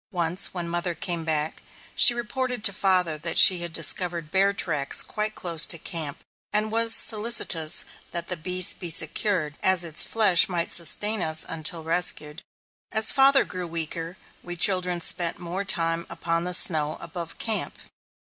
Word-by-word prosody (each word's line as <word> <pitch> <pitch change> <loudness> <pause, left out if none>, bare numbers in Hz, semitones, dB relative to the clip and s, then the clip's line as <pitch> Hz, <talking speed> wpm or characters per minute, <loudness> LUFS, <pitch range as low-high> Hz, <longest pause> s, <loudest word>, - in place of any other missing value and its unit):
Once, 175 0 +1
when 175 -2 -7
mother 175 0 -5
came 170 -2 -5
back, 155 -1 -4 0.3
she - - +6
reported 250 0 -6
to 200 - +4
father 180 -5 -1
that 165 +1 -4
she 185 -2 +6
had 170 -1 -5
discovered 165 0 -1
bear 195 +1 +1
tracks 150 -8 +1
quite 215 0 -4
close 170 -3 +1
to 170 - +2
camp, 155 -3 -7 0.3
and 215 +1 -2
was 230 0 +4
solicitous 210 -8 +2 0.2
that 170 -1 -8
the 180 - -5
beast 180 +2 0
be 175 - -8
secured, 165 -1 -2
as 190 -2 +3
its 165 -2 +1
flesh 205 -7 +2
might 170 -2 -3
sustain 205 +5 +3
us 160 -1 0
until 165 0 -1
rescued. 165 -1 -1 0.5
As 220 0 +3
father 270 0 +2
grew 180 -1 -9
weaker, 165 +1 -6 0.2
we 175 0 -10
children 180 -1 +1
spent 170 0 +2
more 180 +3 -7
time 170 -3 -1
upon 165 0 -4
the 180 0 0
snow 155 -4 +4
above 170 -3 -10
camp. 225 -2 0
175 Hz, 160 wpm, -22 LUFS, 165-195 Hz, 0.5 s, she